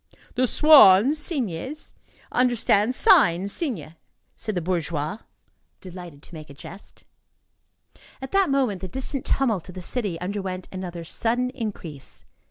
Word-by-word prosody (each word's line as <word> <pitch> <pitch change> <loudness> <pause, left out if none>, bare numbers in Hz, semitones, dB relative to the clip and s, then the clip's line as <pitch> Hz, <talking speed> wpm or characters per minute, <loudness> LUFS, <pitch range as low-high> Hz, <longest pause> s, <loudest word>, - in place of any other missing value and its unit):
"The 255 +1 +1
swans 275 -2 +6
[cygnes] 275 - -3 0.4
understand 240 -2 +2
signs 180 -1 +4
[signes]," 200 - -4 0.4
said 215 -2 -5
the - - +1
bourgeois, 165 0 -2 0.6
delighted 175 -5 -10
to - - -15
make 155 -2 -10
a 140 - -12
jest. 195 +7 -12 1.2
At 265 0 -8
that 390 -3 +3
moment, 255 -9 0
the 190 - -5
distant 265 - -4
tumult 220 -10 0
of 185 - -10
the 185 - -6
city 200 -4 -2
underwent 185 0 -4
another 180 -3 -6
sudden 240 +8 -1
increase. 200 - -7
200 Hz, 130 wpm, -24 LUFS, 175-255 Hz, 1.2 s, swans